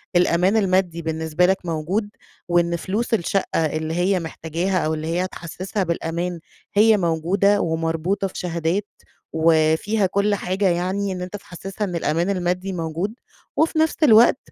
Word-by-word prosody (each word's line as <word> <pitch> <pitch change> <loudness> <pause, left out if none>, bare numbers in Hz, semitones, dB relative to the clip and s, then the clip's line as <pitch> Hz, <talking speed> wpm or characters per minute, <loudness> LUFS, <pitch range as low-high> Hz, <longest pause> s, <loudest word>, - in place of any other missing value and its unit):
الأمان 180 +3 +3
المادي 185 -4 +1
بالنسبة 160 +1 0
لك 190 +1 +3
موجود، 175 +6 -2 0.4
وإن 175 -1 +2
فلوس 205 +8 -2
الشقّة 190 -4 +1
اللي 155 +1 -2
هيّ 180 +2 +1
محتاجاها 165 +3 -2
أو 155 - 0
اللي 155 0 -4
هيّ 170 +2 0
هتحسسها 185 +3 -4
بالأمان 170 +1 -2 0.4
هيّ 215 +1 +6
موجودة 190 +4 +2
ومربوطة 165 +4 -1
في 185 - -13
شهادات 175 +3 -1 0.5
وفيها 160 +6 +2
كل 200 +2 +1
حاجة 190 +1 0
يعني 185 +3 -1
إن 180 -1 -4
أنتَ 180 +2 -6
تحسسها 195 +2 -7
إن 180 -3 -4
الأمان 170 +2 0
المادي 180 0 -1
موجود. 170 +4 -3 0.4
وفي 320 0 +2
نفس 320 0 +2
الوقت، 235 -3 +7
180 Hz, 145 wpm, -22 LUFS, 165-195 Hz, 0.5 s, الوقت